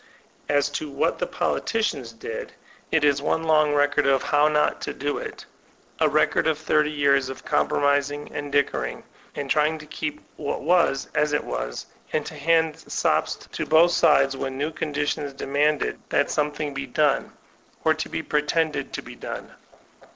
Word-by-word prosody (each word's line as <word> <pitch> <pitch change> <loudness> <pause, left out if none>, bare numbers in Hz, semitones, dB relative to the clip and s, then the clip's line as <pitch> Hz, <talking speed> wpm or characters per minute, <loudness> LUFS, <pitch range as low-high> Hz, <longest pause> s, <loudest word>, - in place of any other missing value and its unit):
As 145 -1 +3
to 145 +1 -4
what 140 - 0
the - - -1
politicians 185 - -1
did, 115 0 -7 0.4
it 160 -2 +3
is 140 -1 +3
one 160 +2 0
long 155 -2 +3
record 145 -1 +2
of 135 -1 +3
"how 145 0 +3
not 150 -1 +1
to - - -4
do 145 +1 -2
it," - - -8 0.5
a - - +4
record - - +2
of 160 -2 +2
thirty 150 0 +2
years 140 -3 +2
of 130 - -8
com - - +2
promising, 145 0 0
and 145 -1 -4
dickering, 140 0 0 0.3
and 145 - -4
trying 155 +2 +2
to 155 - -11
keep 150 0 -4 0.2
what 145 - -3
was 165 -4 +2
as 150 0 +1
it 150 - +1
was, - - -4 0.3
and 155 - 0
to - - -7
hand 160 +1 +1
sops - - 0
to - - -6
both 170 +2 +6
sidesi 135 -5 +4
when 135 0 -4
new 150 +3 -1
con 155 -1 -4
ditions 145 -1 -2
demanded 145 - 0
that - - +1
something 150 -1 -1
be 135 0 -4
done, 145 +2 +1 0.5
or 160 - +5
be 160 +1 -4
pretended 150 +1 0
to - - -4
be - - -10
done. - - -7
145 Hz, 175 wpm, -24 LUFS, 140-155 Hz, 0.5 s, both